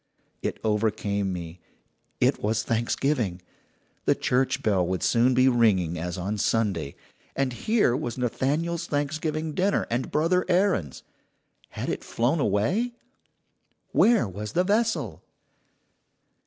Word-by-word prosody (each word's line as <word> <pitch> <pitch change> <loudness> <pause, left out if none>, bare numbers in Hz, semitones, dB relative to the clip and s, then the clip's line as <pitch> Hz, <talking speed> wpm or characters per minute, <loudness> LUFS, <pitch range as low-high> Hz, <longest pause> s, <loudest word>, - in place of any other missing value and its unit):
"It - - -2
overcame 105 -2 0
me. 85 -1 -6 0.6
It - - +2
was 110 +1 0
Thanksgiving. 115 -3 0 0.7
The - - +4
church 130 +1 0
bell 100 -4 +2
would 95 0 -2
soon 125 +2 +3
be 130 +1 +5
ringing 100 -9 +2
as 85 +1 -4
on 100 +4 -3
Sunday. 95 -11 0 0.4
And 135 -2 0
here 205 - +2
was 130 -4 -3
Nathaniel's 155 +8 -1
Thanksgiving 155 +2 -2
dinner 195 +5 +1
and 120 +2 -1
Brother 170 +4 +2
Aaron's 180 - +1 0.7
had - - -5
it - - -3
flown 125 +8 0
away? 150 - +1 1.0
Where 230 - +4
was 105 +3 -6
the 180 - +3
vessel? 220 +4 0
120 Hz, 120 wpm, -26 LUFS, 100-155 Hz, 1.0 s, be